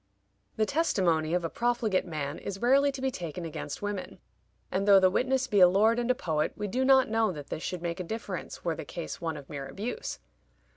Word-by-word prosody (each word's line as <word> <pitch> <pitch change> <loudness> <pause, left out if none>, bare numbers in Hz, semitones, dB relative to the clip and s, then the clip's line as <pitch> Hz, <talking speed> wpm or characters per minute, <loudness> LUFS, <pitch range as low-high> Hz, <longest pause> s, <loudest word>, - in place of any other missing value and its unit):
The 215 - +2
testimony 180 - +1
of 175 -1 0
a - - -1
profligate 235 -6 0
man 150 -2 -4
is 195 -1 -6
rarely 275 +4 +4
to 270 - -7
be 265 - +1
taken 175 - -5
against 155 +1 -6
women; 205 -2 -4 0.5
and 195 +2 0
though 200 -1 +8
the 185 -1 +4
witness 260 +5 +1
be 205 -6 +2
a 180 - +9
lord 215 +6 +3
and 240 0 -1
a 250 - +4
poet, 155 -7 -1
we 210 - -3
do 250 +6 0
not 265 0 +5
know 225 -1 +1
that 145 -4 -9
this 155 - -3
should 180 -1 -4
make 170 0 -3
a - - -2
difference 205 -1 -6
were 170 - +1
the - - -6
case 170 - -6
one 165 -2 -2
of 140 -2 -10
mere 140 -2 -6
abuse. 210 - -5
195 Hz, 225 wpm, -29 LUFS, 165-240 Hz, 0.5 s, a